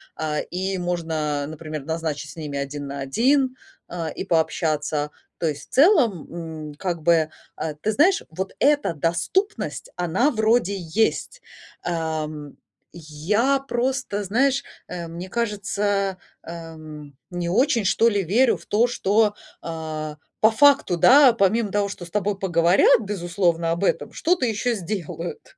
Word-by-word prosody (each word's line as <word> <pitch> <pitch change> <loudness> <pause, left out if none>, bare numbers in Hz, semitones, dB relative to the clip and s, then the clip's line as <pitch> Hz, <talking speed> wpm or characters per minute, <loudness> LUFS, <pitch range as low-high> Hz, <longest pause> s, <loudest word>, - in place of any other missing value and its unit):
А, 150 -1 -2
и 190 +2 -3
можно, 160 -5 -2
например, 155 -2 -6
назначить 160 -2 -3
с - - -13
ними 145 -3 -5
один 140 +1 -4
на 140 0 -6
один, 255 - +2 0.3
а, 170 -2 -4
и - - -5
пообщаться. 155 -3 0 0.3
То 165 - 0
есть, 145 -1 -7
в - - -21
целом, 265 - +4 0.4
м, - - -10
как 175 0 -3
бы, 160 0 +3 0.3
э, 155 -1 -3
ты 215 - +1
знаешь, 350 - +3
вот 190 +4 -5
эта 290 - +3
доступность 170 - -1
она 180 - +1
вроде 220 -2 +2
есть. 220 - -1 0.4
Эм, 155 -3 -3 0.4
я 180 - 0
просто, 250 -4 -1
знаешь, 265 +7 +1 0.2
э, 175 -2 -6
мне 175 +3 -7
кажется, 205 -3 -1 0.3
эм, 155 -3 -9 0.2
не 175 -1 -3
очень, 235 +1 +2
что 230 +4 +4
ли, 205 -2 0
верю 230 +9 +3
в - - -17
то, 220 +4 +3
что, 210 -2 +2 0.3
э, 155 -2 -5 0.3
по 220 - +6
факту, 280 -7 +4
да, 265 - +7
помимо 210 0 +1
того, 205 -1 +1
что 180 -3 -7
с 170 - -14
тобой 205 -1 -1
поговорят, 175 +1 +4
безусловно, 175 -4 0
об 170 +4 -2
этом, - - 0
что-то 345 -5 +1
еще 235 +2 0
сделают 175 -3 -6
180 Hz, 145 wpm, -23 LUFS, 160-225 Hz, 0.4 s, да